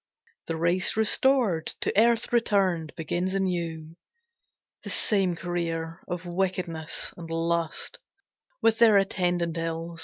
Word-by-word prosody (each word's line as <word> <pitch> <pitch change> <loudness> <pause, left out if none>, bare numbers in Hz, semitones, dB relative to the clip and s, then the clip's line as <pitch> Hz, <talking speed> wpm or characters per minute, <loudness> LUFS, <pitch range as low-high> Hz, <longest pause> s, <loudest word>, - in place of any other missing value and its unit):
The 165 - -2
race 175 +5 +1
restored, 220 - +2
to - - -1
earth 235 +3 +3
returned, 190 -9 +2
begins 175 +4 -2
anew 170 -4 -2 0.8
The - - -8
same 195 -4 +2
career 165 -1 -3
of 180 0 -5
wickedness 175 -3 -2
and 165 -2 -9
lust, 165 0 -2 0.6
With 225 0 +3
their 225 -3 +7
attendant 175 -4 0
ills. 165 0 -4
175 Hz, 115 wpm, -27 LUFS, 165-195 Hz, 0.8 s, their